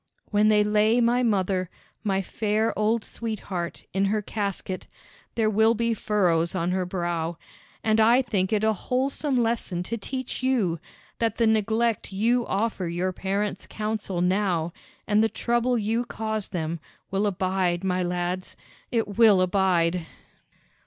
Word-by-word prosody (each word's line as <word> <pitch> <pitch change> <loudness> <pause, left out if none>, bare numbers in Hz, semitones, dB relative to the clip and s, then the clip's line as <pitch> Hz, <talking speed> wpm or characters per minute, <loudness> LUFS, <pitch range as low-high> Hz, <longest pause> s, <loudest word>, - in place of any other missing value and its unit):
"When 210 +1 +4
they 210 -1 +5
lay 215 +3 +3
my 240 +1 +3
mother, 190 -5 +1 0.3
my 195 -2 0
fair 215 +3 0
old 215 +1 +1
sweetheart, 195 -6 -5
in 195 +1 +2
her 210 +1 0
casket, 200 -3 -4 0.5
there 225 -2 +2
will 220 +2 +4
be 230 +1 +1
furrows 180 -6 +1
on 175 0 0
her 185 -1 -1
brow; 170 -2 -2 0.5
and 220 0 +3
I 235 +4 +5
think 195 -6 -1
it 215 -1 +1
a 220 0 +3
wholesome 265 +5 -1
lesson 225 -7 0
to 230 +5 -3
teach 260 +4 -5
you, 225 -11 +1 0.4
that 225 -2 0
the 230 - +3
neglect 220 0 +1
you 230 +5 +1
offer 200 -3 -1
your 175 +2 -1
parents' 195 +1 -2
counsel 210 -4 -2
now, 180 -3 +1 0.3
and 210 +1 +3
the 225 - +2
trouble 240 +2 +1
you 225 +2 0
cause 220 -3 -3
them, 165 -1 -3 0.3
will 195 +2 +1
abide, 185 -2 0
my 185 -1 0
lads, 180 +1 -2 0.3
it 225 -3 -1
will 215 -5 +7
abide!" 180 -3 +2
205 Hz, 145 wpm, -25 LUFS, 185-225 Hz, 0.5 s, will